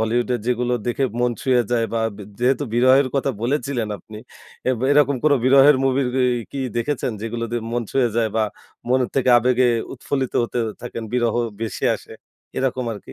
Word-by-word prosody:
বলিউডের 120 +1 0
যেগুলো 125 0 0
দেখে 130 +3 0 0.2
মন 125 0 +2
ছুঁয়ে 125 -2 +3
যায় 115 -2 +2
বা 115 - 0 0.2
ব - - -16 0.2
যেহেতু 130 +4 +1
বিরহের 130 +2 +5
কথা 140 0 +1
বলেছিলেন 125 -3 -1
আপনি, 105 +4 -11 0.5
এব 130 - +2
এরকম 145 -1 +4
কোনো 145 -2 +5
বিরহের 135 +2 +7
মুভির 130 -1 +1 0.3
ই - - -6
কি 140 - -5 0.2
দেখেছেন? 125 +1 -1
যেগুলো 115 +1 -3
দিয়ে 120 -1 -2
মন 120 0 0
ছুঁয়ে 130 -3 +2
যায় 115 -1 +2
বা 110 - +3 0.5
মনের 125 0 +2
থেকে 130 -1 +2
আবেগে 125 +1 +2 0.3
উৎফুল্লিত 135 0 -3
হতে 120 +1 -3 0.2
থাকেন, 120 -1 -6
বিরহ 120 -3 +1 0.3
বেশি 110 - -4
আসে - - -15 0.4
এরকম 130 -1 -1
আরকি? 100 - -11
125 Hz, 175 wpm, -21 LUFS, 120-135 Hz, 0.5 s, বিরহের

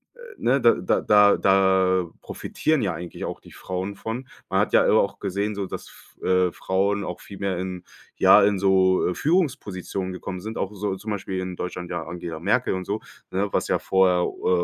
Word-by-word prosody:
äh, - - -23 0.2
ne, 130 +3 +2
da 115 - +6
da 90 - 0
da 105 -1 +5
da 95 -2 +3
profitieren 155 -3 -1
ja 95 -4 -1
eigentlich 90 0 -7
auch - - -4
die - - -17
Frauen 95 +2 -5
von. 115 +5 -5 0.2
Man 95 - 0
hat - - -1
ja - - +5
auch 100 -2 +2
gesehen 100 +2 -2
so, 100 -2 -4
dass - - -7 0.3
F - - -17
äh, 90 -1 +3
Frauen 100 +3 0
auch 90 - -6
viel 100 - -11
mehr 95 -3 -2
in 90 -1 -5 0.3
ja, - - +7
in 100 0 +3
so, 95 -1 +3
äh, - - -1
Führungspositionen 105 - -1
gekommen 90 0 -6
sind, 110 +3 -6
auch 100 +2 -3
so 100 -1 -2
zum 105 +3 -6
Beispiel 95 -2 -3
in 90 -1 -4
Deutschland 90 0 -5
ja 85 -2 -3
Angela 85 -2 -6
Merkel 100 +8 +1
und 95 0 -4
so, 105 +3 -2 0.3
ne? 100 +2 -1
Was - - 0
ja - - +2
vorher 90 -2 +3
u - - -5
äh, 90 -1 +3
95 Hz, 210 wpm, -24 LUFS, 90-105 Hz, 0.3 s, ja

